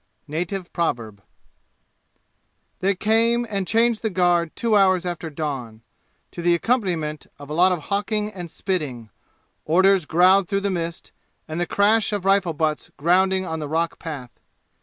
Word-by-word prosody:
Native 175 +4 -4
Proverb 115 - -2 1.6
They 195 +1 +1
came 230 +4 +2
and 200 -3 -2
changed 230 0 +2
the 220 - -1
guard 175 -3 +1
two 230 -2 +1
hours 185 -3 +4
after 175 -2 -4
dawn, 135 -7 -5 0.5
to - - -7
the 175 0 +3
accompaniment 170 -8 -1
of 145 +1 -11
a - - -2
lot 180 +4 +4
of 175 -5 -2
hawking 210 +1 -1
and 175 -3 -7
spitting, 140 - -3 0.5
orders 185 +1 +3
growled 185 +3 +4
through 195 +1 -1
the 200 0 -1
mist, 170 -2 -4 0.4
and 160 +1 -4
the 175 - -1
crash 210 +2 +2
of 200 -2 -3
rifle 195 -3 +3
butts 155 0 -1
grounding 190 +4 +2
on 160 -2 -4
the 150 -2 -5
rock 165 +2 -1
path. 145 -7 -7
180 Hz, 155 wpm, -23 LUFS, 160-200 Hz, 1.6 s, hours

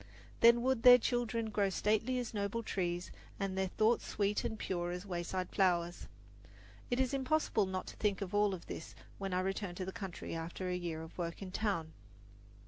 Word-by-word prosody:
Then 235 +1 +7
would 260 -2 +2
their 245 +1 +10
children 230 -2 -1
grow 200 -2 +2
stately 220 +6 +1
as 245 -2 -3
noble 205 +2 -2
trees, 175 -3 -2 0.3
and 195 -2 -1
their 190 0 +1
thoughts 220 +5 +2
sweet 205 0 0
and 220 - -3
pure 175 -4 -2
as 180 +2 -4
wayside 180 0 -3
flowers. 175 -2 +1 0.8
It 245 - 0
is 260 0 +1
impossible 265 -6 +1
not 185 0 -3
to - - -9
think 205 -3 +1
of 185 - -7
all 205 0 +4
this 175 -3 -6 0.2
when 195 -1 -3
I 180 0 +1
return 190 -1 -2
to 185 - -4
the 190 - -4
country 195 -4 -6
after 165 +3 -4
a 180 - 0
year 170 -3 -3
of 160 - -11
work 170 +2 -3
in 185 - -7
town. 185 -7 -1
195 Hz, 190 wpm, -34 LUFS, 180-220 Hz, 0.8 s, their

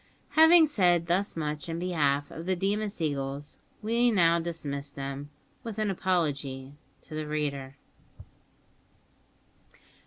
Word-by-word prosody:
Having 320 +3 +7
said 180 - +2
thus 180 +4 0
much 150 0 -3
in 165 - -3
behalf 150 -5 0
of 165 +2 -8
the 185 - +2
Deemas 200 +2 -1
eagles, 140 -2 -3 0.2
we 235 +3 +3
now 170 -6 +4
dismiss 150 -4 -4
them, 140 0 -6 0.3
with 225 -2 -6
an 215 -2 0
apology 145 -8 -1 0.3
to - - -11
the 155 0 -3
reader. 140 -3 -3
165 Hz, 120 wpm, -28 LUFS, 145-195 Hz, 0.3 s, Having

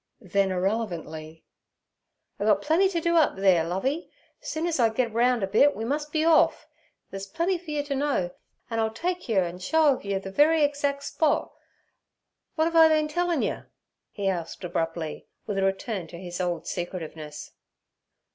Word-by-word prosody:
then 195 -1 0
irrelevantly, 175 -5 -3 0.9
'I 205 - -1
gut 205 -2 +4
plenty 340 +6 +3
t' 350 -3 -1
do 340 +1 +2
up 315 - +4
theere, 190 -4 +4
Lovey; 225 - -2 0.3
soon 315 +1 -3
ez 335 -5 -1
I 230 -2 +5
git 230 0 -1
roun' 240 -1 +2
a - - +1
bit 250 +9 +4
we 225 - -4
mus' 295 +4 -1
be 310 +1 0
orf. 330 -1 +4 0.5
There's 195 0 -6
plenty 340 - -1
fer 340 -2 -13
you 295 -1 -1
t' 285 -1 -3
know, 275 -11 0 0.4
an' 225 - -1
I'll 220 0 +2
take 350 +8 -3
yer 195 -4 +3
and 175 +1 -6
show 305 +8 +4
of - - -11
yer 200 -1 -1
the 195 0 -6
very 310 +7 +4
exac' 285 -1 0
spot. 310 0 0 1.0
W'at'ave 330 +1 +3
I 320 - +9
been 310 -1 +3
a - - -6
tellin' 350 -3 +1
yer?' - - -3 0.4
he 200 - -6
said 180 -3 -2
abruptly, 165 -2 -3 0.2
with 205 -2 -2
a - - +1
return 195 -1 -2
to 170 - -10
his 175 0 -5
old 175 -2 -2
secretiveness. 160 -4 -6
225 Hz, 180 wpm, -26 LUFS, 185-305 Hz, 1.0 s, I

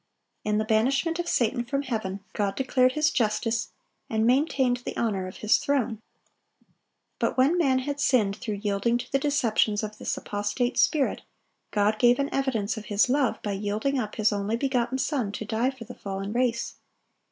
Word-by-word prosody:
(883) - - -1
In 210 - +2
the 215 - 0
banishment 270 +10 +1
of 345 - -2
Satan 240 +1 +1
from 275 +3 -2
heaven, 215 -6 -3
God 200 -2 -1
declared 255 -1 +2
His 305 +1 +2
justice, 225 0 0 0.4
and 220 0 +1
maintained 260 -1 +2
the 245 - -7
honor 200 -5 -1
of 185 - -9
His 215 - +5
throne. 245 -6 -1 1.2
But - - 0
when 270 +6 +4
man 275 -7 +3
had 285 +2 -3
sinned 220 -8 +2
through 210 -5 -4
yielding 205 +3 +1
to 245 - -8
the 275 - +2
deceptions 230 -7 +1
of 215 0 -6
this - - -2
apostate 205 +5 -2
spirit, 290 -3 +2 0.5
God 210 +1 +1
gave 245 0 +5
an 280 0 -2
evidence 235 -6 0
of 215 - -7
His 205 +4 +2
love 265 -2 +1
by 205 - -2
yielding 210 +7 -1
up 215 -4 -4
His 215 -1 +2
only 205 +2 -1
begotten 255 0 0
Son 260 -5 -1
to 215 - -5
die 225 +4 0
for 260 -3 -8
the - - -9
fallen 195 +1 -5
race. 240 -1 0
235 Hz, 185 wpm, -26 LUFS, 210-265 Hz, 1.2 s, His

